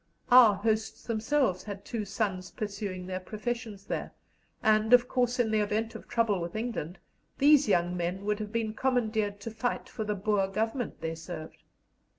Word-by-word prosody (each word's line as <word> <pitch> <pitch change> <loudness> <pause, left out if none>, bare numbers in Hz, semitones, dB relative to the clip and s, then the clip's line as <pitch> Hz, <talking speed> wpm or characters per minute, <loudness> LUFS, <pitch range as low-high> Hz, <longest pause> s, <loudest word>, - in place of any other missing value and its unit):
Our 240 -5 +9
hosts 220 +2 -1
themselves 230 -3 +1
had 200 -1 -7
two 225 -3 -3
sons 195 -2 -2
pursuing 200 -3 -5
their 185 0 -3
professions 215 0 -5
there, - - -4 0.5
and, 215 +1 +4
of 245 0 +7
course, 245 -1 +1
in 235 -3 +2
the 215 - +3
event 215 +2 -1
of - - -10
trouble 220 -6 +1
with 170 +3 -5
England, 215 -7 -3 0.4
these 290 -1 +6
young 175 -2 +2
men 180 +3 -3
would 210 0 0
have 210 -1 -5
been 225 -1 -1
commandeered 220 -5 0
to 230 - -5
fight 245 +3 -2
for 220 - -5
the 210 -1 -1
Boer 200 0 +1
Government 225 +4 -2
they 160 0 -2
served. 165 -1 -8
215 Hz, 170 wpm, -29 LUFS, 195-230 Hz, 0.5 s, Our